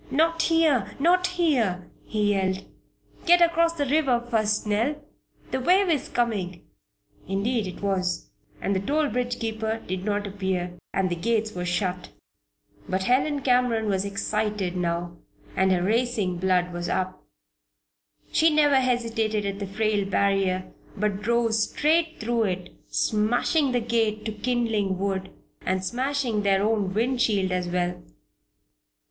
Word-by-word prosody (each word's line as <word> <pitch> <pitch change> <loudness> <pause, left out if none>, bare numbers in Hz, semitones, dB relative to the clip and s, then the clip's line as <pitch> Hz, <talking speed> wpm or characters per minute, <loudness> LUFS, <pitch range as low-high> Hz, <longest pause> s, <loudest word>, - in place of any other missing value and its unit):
"Not 330 +4 +2
here! 320 - +2
Not 360 +5 +3
here!" 255 - 0 0.2
he 210 -1 +1
yelled. 190 -1 -1 0.6
"Get 350 +1 +7
across 335 -1 +3
the 290 -4 -1
river 275 -3 +2
first, 215 -2 +1
Nell! 220 +8 +1 0.6
That 260 -1 -1
wave 375 +4 +4
is 300 -6 0
coming!" 200 -8 -1 0.6
Indeed 205 +3 0
it 185 +2 -8
was. 185 -3 -1 0.3
And 200 - -1
the - - +2
toll 295 +9 0
bridge 245 +2 -2
keeper 220 0 -2
did 185 0 -3
not 205 0 -1
appear, 190 -3 -2 0.2
and 190 -2 0
the - - 0
gates 215 +4 0
were 180 0 -4
shut. 180 0 -2 0.8
But 190 +1 0
Helen 275 +6 +2
Cameron 245 -3 +2
was 190 -1 +1
excited 200 -1 -2
now 175 -1 -2 0.4
and 190 0 +3
her 180 -1 +2
racing 215 -3 0
blood 180 -1 +1
was 175 0 -4
up. 185 0 -2 1.1
She 325 0 +4
never 295 -2 +4
hesitated 230 -4 0
at 200 0 -3
the 200 - -4
frail 210 +1 0
barrier, 195 -2 +1 0.3
but 205 -1 -1
drove 235 +1 +1
straight 315 +9 +1
through 230 0 0
it, 185 -2 -4 0.2
smashing 245 +7 +1
the 245 - +2
gate 220 -2 0
to 220 - -2
kindling 220 -4 0
wood, 190 0 -2 0.3
and 185 0 -1
smashing 250 +1 -1
their 195 -1 +2
own 210 -3 +1
wind 240 +5 0
shield 200 -6 +2
as 180 -1 -1
well. 175 0 -1
215 Hz, 145 wpm, -25 LUFS, 190-250 Hz, 1.1 s, Get